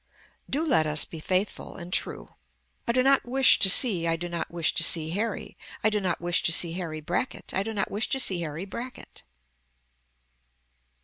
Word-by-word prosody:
DO 300 +5 -1
LET 200 - +2
US 150 0 +3
BE 165 - -10
FAITHFUL 185 +5 -2
AND 175 +1 -9
TRUE - - -1 0.5
I - - +2
do 255 +1 +1
not 275 +1 +3
wish 265 +1 +4
to 195 - +6
see 190 -6 +3
I 165 - +1
do 175 +2 -6
not 170 -1 -5
wish 170 -2 -1
to - - +2
see 160 -1 +4
Harry 210 +3 -4 0.3
I 215 - +3
do 210 - 0
not 185 -4 -2
wish 175 0 0
to - - 0
see 170 0 +4
Harry 165 -3 -6
Brackett 175 - -4
I 190 - 0
do 220 +3 -4
not 205 -3 -3
wish 210 +2 -2
to 270 - 0
see 185 -8 +2
Harry 160 +2 -5
Brackett. 240 +6 -9
185 Hz, 195 wpm, -26 LUFS, 170-225 Hz, 0.5 s, to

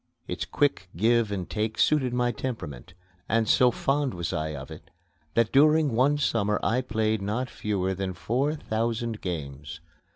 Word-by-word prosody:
Its - - -3
quick 140 -10 0
give 115 +2 +3
and 95 -3 -3
take 110 0 -2
suited 135 -5 +3
my 120 0 +1
temperament, 95 - -6 0.3
and 115 -1 +2
so 125 +3 +5
fond 135 +1 0
was 85 -1 -3
I 75 0 -2
of 65 -1 -8
it - - -11 0.5
that 115 -1 +3
during 150 +1 +5
one 135 +5 +3
summer 105 -7 +1
I 125 +3 +2
played 110 -3 0
not 110 +6 -2
fewer 95 -3 -1
than 95 -1 -3
four 135 +10 0
thousand 115 -3 -2
games. 75 -2 -5
110 Hz, 160 wpm, -27 LUFS, 95-125 Hz, 0.5 s, so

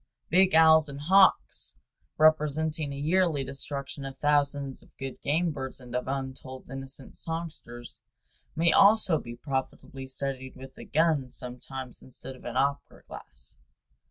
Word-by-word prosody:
Big 185 0 +5
owls 160 -1 +6
and 140 0 -7
hawks, 190 +5 +3 0.4
representing 155 0 +2
a - - -5
yearly 155 0 +1
destruction 140 +1 -6
of 135 0 -7
thousands 140 -2 0
of - - -20
good 135 -1 -7
game 165 +4 +1
birds 130 -3 -6
and 125 -1 -9
of 125 - -2
untold 130 -1 -5
innocent 135 0 -8
songsters, 160 -8 -7 0.5
may 165 +1 +4
also 200 -5 +5
be 120 -1 -8
profitably 135 0 -5
studied 130 0 -4
with 130 +1 -11
a - - -10
gun 155 -4 +2
sometimes 125 +1 -7
instead 130 +1 -10
of - - -16
an 120 +1 -4
opera 140 +1 -1
glass. - - -12
140 Hz, 140 wpm, -28 LUFS, 130-155 Hz, 0.5 s, owls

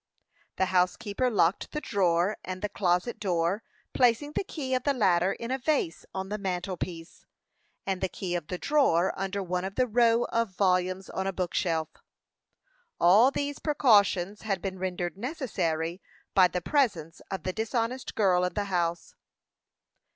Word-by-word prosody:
The 190 - +2
housekeeper 200 +7 +1
locked 195 -4 +1
the 300 - -1
drawer 185 - +1
and 185 +1 -6
the 210 - 0
closet 185 +5 0
door, 180 0 0 0.3
placing 250 +4 +2
the 305 - -1
key 280 -8 -4
of 255 - +2
the 280 +2 +1
latter 190 -4 +3
in 235 +1 -6
a 265 - -1
vase 265 - -1
on 190 0 -5
the 210 +1 -3
mantel 185 -1 -2
piece, 170 -1 -7 0.6
and 190 -2 -2
the 190 - 0
key 180 -1 -4
of 170 -3 -3
the 180 - -4
drawer 190 - +2
under 195 +1 -3
one 180 0 -2
of 195 +1 -5
a 255 - +4
row 235 0 +3
of 230 -5 -1
volumes 185 -1 +1
on 190 0 -2
a - - 0
book 180 -2 -3
shelf. 160 -3 0 1.1
All 200 +9 +6
these 285 +1 -3
precautions 205 - +3
had 195 -3 -1
been 190 0 -5
rendered 180 -1 -3
necessary 190 - -2 0.3
by 185 -2 +6
the 180 0 -3
presence 180 - 0
of 190 - -4
the 185 - -2
dishonest 230 +4 -2
girl 185 -4 +3
in 180 -1 -2
the 205 - 0
house. 170 -1 -1
190 Hz, 165 wpm, -28 LUFS, 180-230 Hz, 1.1 s, All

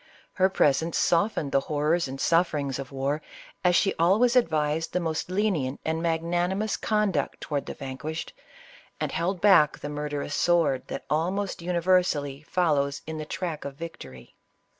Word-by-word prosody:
Her 190 0 +3
presence 160 -2 +2
softened 170 -5 +1
the 135 - +4
horrors 155 +3 0
and 135 +1 -7
sufferings 150 -6 +1
of 135 0 -7
war, 140 +3 -1 0.4
as 180 -1 +4
she 195 +3 +3
always 215 +9 +4
advised 160 -7 +1
the 180 - +1
most 160 -1 -2
lenient 185 -9 0
and 160 +1 -1
magnanimous 175 +5 0
conduct 210 -9 0
toward 145 -2 -3
the - - -5
vanquished, 140 +4 -6 0.7
and - - -2
held 175 +2 -1
back 170 -8 +5
the 145 - -6
murderous 145 -1 -4
sword 160 -7 +2
that - - -6
almost 180 +5 -1
universally 170 -5 +1
follows 150 -4 0
in 160 0 -5
the 155 - -4
track 170 -2 -4
of 140 -1 -6
victory. 70 - -10
160 Hz, 150 wpm, -26 LUFS, 145-180 Hz, 0.7 s, back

